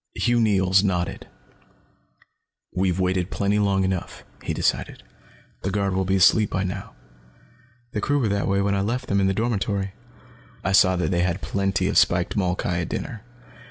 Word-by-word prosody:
Hugh 120 0 +2
Neils 95 -3 +3
nodded. 90 -3 -2 1.5
"We've 95 -1 0
waited 90 -1 0
plenty 100 +1 0
long 100 -2 +2
enough," 95 -2 -3 0.2
he - - -4
decided. - - -1 0.6
"The 95 - -2
guard 100 -1 0
will 95 0 0
be 95 +1 +1
asleep 95 +3 +4
by 95 - -1
now. 95 - -5 1.0
The 105 - -3
crew 145 +7 +1
were 125 -6 +1
that 100 0 0
way 100 0 +1
when 100 0 +1
I 100 - +1
left 125 +5 -2
them, 100 0 +2
in 95 - +3
the 95 - +1
dormitory. 100 -3 -1 0.7
I 95 - 0
saw 95 -1 +5
that 90 +2 -1
they 85 -1 +1
had 90 +1 -1
plenty 100 0 0
of - - +4
spiked 90 +2 +1
molkai 90 -3 0
at 85 - -4
dinner. 115 -7 -5
95 Hz, 175 wpm, -24 LUFS, 95-100 Hz, 1.5 s, saw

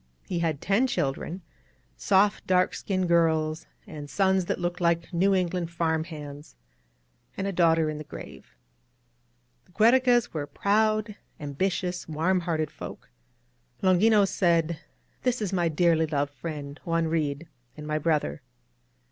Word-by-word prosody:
He 175 - -2
had 160 -4 -1
ten 205 +8 +2
children, 170 - -2 0.3
— - - -38 0.2
soft, 200 - +2
dark 185 0 +3
60 - - -7
AN 190 - +2
OUTPOST - - +1
OF - - 0
THE - - +3
REVOLUTION 160 -2 +2
skinned 170 - -17 0.2
girls, - - -11
and 145 -1 -8
sons 190 0 +2
that - - -2
looked 175 0 -3
like 170 +1 +1
New 190 +3 +3
England 180 -2 -1
farmhands, 160 - -4 0.4
— - - -40
and 195 - -2
a 200 - -1
daughter 165 -3 +3
in 155 -1 -3
the - - -6
grave. 70 - -11 1.1
The - - -26
Giierecas 240 +2 +4
were 145 -3 -3
proud, 215 +2 +1 0.2
ambitious, 180 +4 -2
warm 165 +5 +1
hearted 160 -3 -2
folk. - - -10 0.7
Longinos 195 +2 +4
said: 170 -4 +1 0.4
^^This 250 -1 +1
is 200 -3 -3
my 175 -2 +2
dearly 160 0 +2
loved 145 -1 -1
friend, 145 0 -7
Juan 165 -1 0
Reed, 155 -1 -1 0.3
and 150 - -8
my 155 0 -1
brother." 155 -1 0
170 Hz, 160 wpm, -27 LUFS, 155-190 Hz, 1.1 s, Giierecas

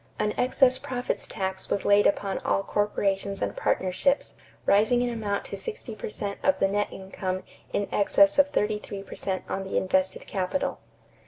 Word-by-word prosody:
An 210 0 0
excess 255 0 +3
profits 250 -1 -3
tax 190 -2 -4
was 200 - -1
laid 205 0 +6
upon 195 -1 0
all 195 - 0
corporations 200 -1 0
and - - -2
partnerships, 190 +10 +1 0.3
rising 220 +5 +4
in 245 - 0
amount 210 -3 -2
to - - -6
sixty 430 - -5
per 215 - -6
cent 200 -1 -4
of 285 - +3
the 195 - +3
net 205 +1 0
income 190 -1 -4 0.3
in 205 - 0
excess 200 +2 +4
of 285 0 +6
thirty 210 -4 0
three 200 -1 -7
per - - -10
cent 190 -1 -2
on 195 - -2
the 190 - -2
invested 190 0 +1
capital. 190 +8 -2
200 Hz, 175 wpm, -27 LUFS, 195-225 Hz, 0.3 s, laid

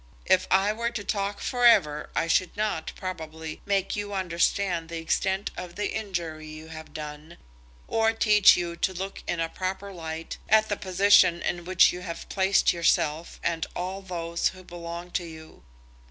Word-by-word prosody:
"If 185 0 +3
I 195 +2 +3
were 235 +2 -1
to 235 -3 -5
talk 200 -1 -2
for 245 -1 -2
ever, 165 -11 +5
I - - +2
should 175 +3 +1
not, 210 -7 -1
probably, 160 -4 -6
make 195 -1 +1
you 205 -1 -4
understand 175 -1 0
the 170 - -4
extent 190 +4 -1
of 180 -1 -7
the 205 - -2
injury 170 -7 -4
you 155 +1 -10
have 160 -1 -9
done, 150 +1 -8 0.5
or 225 0 +2
teach 210 -2 +6
you 170 -1 -3
to 190 +2 0
look 190 +2 -5
in 175 - -1
a 165 - +1
proper 190 +3 -4
light 165 -2 -6
at 220 0 +5
the 205 - +1
position 190 -2 +4
in 175 -1 -2
which 185 0 +5
you 180 - -6
have 170 -2 -7
placed 190 0 +3
yourself 165 -1 0
and 165 -1 -1
all 185 +2 -4
those 170 -3 -2
who 185 0 -7
belong 175 0 -8
to 175 - -1
you. 160 -1 -12
180 Hz, 175 wpm, -26 LUFS, 165-200 Hz, 0.5 s, teach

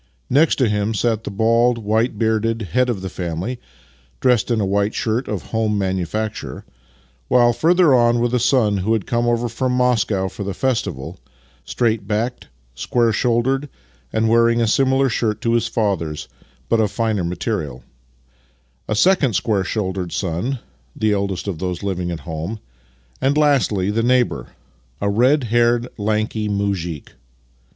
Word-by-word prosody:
Next 150 +5 +4
to 130 - +2
him 105 +1 0
sat 110 0 0
the - - -3
bald, 115 +4 +2
white 110 +1 0
bearded 110 +1 0
head 125 +8 +1
of 105 -6 -2
the - - -3
family 90 +8 -4 0.6
(dressed 125 -3 +2
in 115 -2 +1
a 100 - +1
white 100 +2 0
shirt 115 +3 -1
of 105 -5 -5
home 110 -2 0
manufacture), 95 - -3 0.6
while, 120 -1 +4
further 165 +4 +4
on, 120 -1 +4
were 120 - +2
the 125 +1 0
son 120 -4 +2
who 100 +4 0
had 110 -4 -1
come 120 0 0
over 120 0 +1
from 125 +2 -1
Moscow 115 -6 +1
for 100 - -6
the 100 -1 -4
festival 90 - -2 0.5
(straight 110 -4 0
backed, 115 +4 -2 0.3
square 115 - +1
shouldered, 130 +5 +1 0.4
and 110 0 +1
wearing 115 +1 +4
a 115 - +3
similar 135 +4 +2
shirt 110 -2 -1
to 115 - +1
his 115 - +2
father's, 85 -9 -2 0.4
but 115 - +2
of 110 -2 +2
finer 110 -3 -1
material), 85 - -3 1.0
a - - -1
second 160 - +3
square 100 -1 +1
shouldered 95 -3 -3
son 95 +9 -2 0.4
(the 110 -1 +1
eldest 100 -1 -2
of 90 -6 -3
those 90 +1 -3
living 90 -3 -2
at 85 -2 -5
home), 80 +6 -5 0.6
and, 135 +3 +2
lastly, 125 -10 +2
the 115 +2 0
neighbour 125 +1 +1 0.3
— - - -37
a 100 - 0
red 130 +7 +3
haired, 120 +1 +2
lanky 110 0 -1
muzhik. 95 -6 -2
110 Hz, 160 wpm, -20 LUFS, 100-120 Hz, 1.0 s, Next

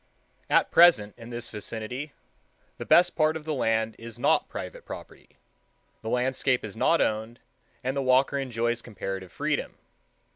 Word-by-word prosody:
At - - +3
present, 165 -13 +6
in 115 -1 -11
this 120 0 -5
vicinity, 110 +7 -6 0.7
the - - -6
best 175 0 +5
part 155 0 +2
of 155 - -12
the 155 - -1
land 110 -4 0
is 115 -1 -8
not - - +2
private - - -7
property; - - -11 0.6
the 110 - -5
landscape 125 +1 +1
is 105 - -8
not 165 +8 +3
owned, 110 +2 -1 0.4
and 130 +2 -1
the 140 - 0
walker 135 +2 +3
enjoys 120 -2 -1
comparative 95 -5 -6
freedom. - - -2
120 Hz, 150 wpm, -27 LUFS, 110-140 Hz, 0.7 s, present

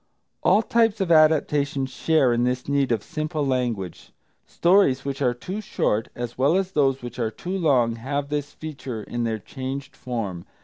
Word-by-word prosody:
All 220 - +4
types 225 -1 +2
of 190 -3 0
adaptation 150 -3 +3
share 135 0 +2
in 120 0 +1
this 125 0 -1
need 140 -2 +1
of 110 -3 0
simple 155 -1 -3
language, 120 -9 -2 0.3
stories 170 -8 +3
which 140 0 -3
are 125 -2 +2
too 185 - -5
short, 110 - 0
as 120 0 -6
well 140 +6 +4
as 190 -1 -1
those 135 -5 +1
which 120 0 -7
are 115 -2 0
too 180 +11 -5
long, 130 -10 +2
have 140 +4 -3
this 145 -1 -2
feature 135 -8 -7
in 120 +2 -3
their 110 -1 -1
changed 135 +5 -6
form. 105 -9 -5
135 Hz, 175 wpm, -24 LUFS, 120-155 Hz, 0.3 s, All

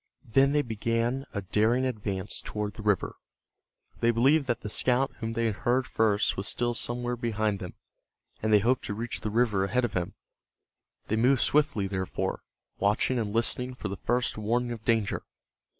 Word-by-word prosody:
Then 135 +4 +4
they 145 0 +2
began 115 +3 -1
a 100 -3 -4
daring 110 +7 +2
advance 105 -5 -3
toward 105 -1 -4
the 110 - -9
river. 105 -3 0 0.8
They 115 - +3
believed 135 +5 +3
that 120 -2 -1
the - - -5
scout 125 +5 +1
whom 115 -1 -3
they 115 0 0
had 110 -3 -1
heard 125 +2 +1
first 110 -1 +1
was 95 +2 -3
still 120 0 0
somewhere 120 +1 -1
behind 110 -4 -1
them, 90 - -7 0.7
and 110 - 0
they 105 - +8
hoped 125 +1 +2
to 105 - -3
reach 115 +2 -3
the 110 - -2
river 110 -3 +2
ahead 125 +6 +1
of 115 - -4
him, 90 -2 -2 0.9
They 110 - -1
moved 125 +3 +4
swiftly, 145 -9 +2
therefore, 95 -3 -2 0.4
watching 105 +5 +2
and 105 -3 -2
listening 125 +3 0
for 105 - -5
the 100 - -3
first 120 -1 0
warning 120 +3 0
of 115 -2 -6
danger. 110 -3 +1
115 Hz, 180 wpm, -28 LUFS, 105-125 Hz, 0.9 s, they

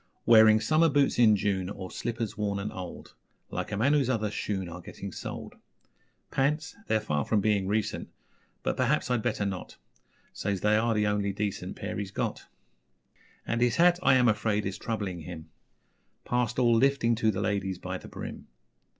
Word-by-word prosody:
Wearing 110 -1 +7
summer 160 +7 +3
boots 140 -3 +2
in 110 -3 +7
June, 95 -2 -1
or 95 -2 -7
Slippers 115 -2 -3
worn 105 -1 -1
and 100 +1 -4
old 90 -2 -8 0.4
Like - - -4
a 100 - -2
man 130 +7 +3
whose 140 -4 +2
other 110 -4 0
shoon 95 -3 -3
are 85 +1 -8
Getting - - -8
soled. - - -7 0.8
Pants? 150 +5 0
They're 110 - +2
far 75 -9 -1
from 110 - +1
being 100 -2 +1
recent 105 +1 -1 0.5
But, - - -1
perhaps, 125 - +1
I'd 120 -2 +2
better 110 -3 -1
not 95 -2 -5 0.6
Says 100 -3 -2
they 105 0 +3
are 115 +1 +2
the 105 0 +2
only 105 -1 0
decent 100 0 -3
Pair - - -4
he's 100 -2 -4
got. 100 - -3 1.0
And 115 0 -1
his 120 -1 +3
hat, 175 +1 +5
I 135 -6 +5
am 125 -1 +4
afraid, 105 -1 +1
is 95 0 -4
Troubling 100 -6 -3
him 80 -1 -9 0.7
Past 120 -1 0
all 120 -2 +4
lifting 130 -1 +3
to 110 -1 +2
the 100 -2 -1
ladies 100 -2 -1
By - - -5
the - - -11
brim. - - -8
105 Hz, 180 wpm, -28 LUFS, 100-120 Hz, 1.0 s, Wearing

